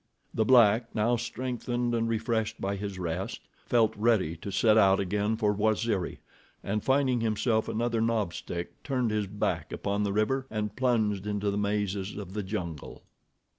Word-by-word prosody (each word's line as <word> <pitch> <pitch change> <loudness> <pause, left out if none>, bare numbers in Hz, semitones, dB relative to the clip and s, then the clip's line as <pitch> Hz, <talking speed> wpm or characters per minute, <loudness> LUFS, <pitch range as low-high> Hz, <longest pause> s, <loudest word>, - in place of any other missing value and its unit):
The 110 - +1
black, 115 -1 +5
now 115 +3 +2
strengthened 120 0 -2
and 115 -1 0
refreshed 110 -1 -1
by 100 +1 -1
his 100 -1 -5
rest, 90 +1 -3 0.3
felt 110 -2 +3
ready 105 -7 +2
to 90 - -7
set 105 +3 +4
out 100 -3 +5
again 105 +3 0
for 105 -2 +2
Waziri, 105 -2 0 0.5
and 105 +1 -2
finding 130 -3 +2
himself 110 0 +1
another 115 0 0
knob 110 -6 0
stick, 85 +1 -6
turned 125 -5 -1
his 105 -2 0
back 100 +2 -2
upon 100 +1 -2
the 100 -1 0
river 120 +6 0
and 105 -1 -3
plunged 110 -6 +1
into 105 -1 -1
the 100 - -2
mazes 100 -1 -1
of 95 -3 -7
the 105 - -2
jungle. 90 -7 -5
105 Hz, 165 wpm, -28 LUFS, 100-115 Hz, 0.5 s, black